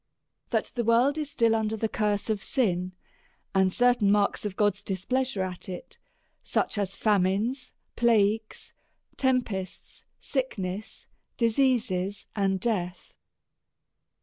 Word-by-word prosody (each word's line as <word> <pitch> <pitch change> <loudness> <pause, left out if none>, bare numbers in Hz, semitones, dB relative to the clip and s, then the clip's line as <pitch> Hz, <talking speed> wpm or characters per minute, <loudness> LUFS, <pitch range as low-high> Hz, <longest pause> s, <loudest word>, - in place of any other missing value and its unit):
That - - 0
the 240 - -1
world 245 +6 +3
is 300 -2 -3
still 230 -5 +2
under 220 0 0
the 225 - 0
curse 210 -2 -1
of 210 -2 -2
sin 185 -8 0 0.6
and 190 -1 +3
certain 245 -3 +3
marks 205 0 +2
of 200 -2 -3
God's 205 -2 +1
displeasure 210 +3 -1
at 185 0 -6
it; 185 +8 -8 0.4
such 210 - -1
as 195 -1 -2
famines, 210 +6 +1 0.2
plagues, 220 -2 +1 0.4
tempests, 240 -9 -2 0.2
sickness, 215 -7 -3 0.3
diseases, 230 -6 +1
and 195 -2 +1
death. 180 -5 -2
210 Hz, 115 wpm, -27 LUFS, 190-240 Hz, 0.6 s, world